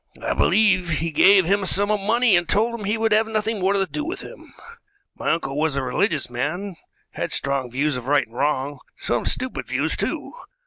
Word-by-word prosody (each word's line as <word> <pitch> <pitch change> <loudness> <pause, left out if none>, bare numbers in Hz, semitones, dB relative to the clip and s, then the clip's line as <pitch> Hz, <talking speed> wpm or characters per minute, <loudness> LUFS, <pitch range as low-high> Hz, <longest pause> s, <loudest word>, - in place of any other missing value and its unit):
I - - -2
believe 190 -5 +3
he 165 +1 -1
gave 190 +4 +5
him 200 +4 +2
a 190 - -3
sum 205 +3 +1
of 210 - +1
money 225 +1 +3
and 175 -1 0
told 225 +4 +2
him 225 -3 -5
he 210 +3 0
would 225 0 0
have 220 +1 +3
nothing 220 0 -2
more 190 +1 +1
to 195 -1 +1
do 300 +10 -5
with 340 +5 -5
him. - - -12 0.6
My - - -3
uncle 140 -5 -2
was 155 -2 0
a 135 - -1
religious 145 - 0
man, 165 +11 -4 0.4
had - - -4
strong 140 -2 -1
views 140 +3 -1
of 125 0 -8
right 145 +1 +3
and 115 - -21
wrong 145 0 -1 0.2
some 120 -1 -2
stupid 255 0 0
views, - - 0
too. - - -3
185 Hz, 215 wpm, -22 LUFS, 145-210 Hz, 0.6 s, gave